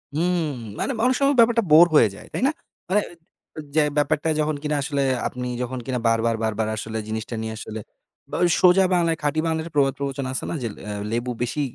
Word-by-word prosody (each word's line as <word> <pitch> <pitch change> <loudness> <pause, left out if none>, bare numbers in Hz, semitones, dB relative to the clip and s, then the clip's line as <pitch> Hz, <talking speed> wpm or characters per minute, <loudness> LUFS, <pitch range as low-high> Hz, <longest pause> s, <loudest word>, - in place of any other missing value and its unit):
হুম। 175 +2 +1 0.4
মানে - - -1
অনেক 255 0 +3
সময় 280 0 +3
ব্যাপারটা 230 0 +5
বোর 160 +3 +9
হয়ে 115 - +7
যায়, - - -13
তাই - - -2
না? 285 - +2 0.4
মানে 205 +2 +3 0.6
অ - - -4 0.2
যে 155 - +5 0.2
ব্যাপারটা 150 +2 +1
যখন 155 0 0
কিনা 150 0 0
আসলে 140 -1 -1 0.3
আপনি 125 0 -5
যখন 125 +1 -3
কিনা 130 -2 -2
বারবার, 115 0 +2
বারবার 110 0 -1
আসলে 110 +1 -5
জিনিসটা 110 +2 -4
নিয়ে 110 0 -4
আসলে 110 0 -6 0.5
বা - - -3
ওই 175 - +4
সোজা 185 +1 +6
বাংলায়, 170 -2 +2
খাঁটি 150 +2 0
বাংলার 160 -1 0
একটা 165 -1 -10
প্রবাদ-প্রবচন 140 -1 0
আছে 130 - -4
না - - -3
যে, 115 - -1
লে - - -15
আ - - -3 0.2
"লেবু 120 +2 -1
বেশি 125 +5 -2
145 Hz, 210 wpm, -23 LUFS, 120-170 Hz, 0.6 s, বোর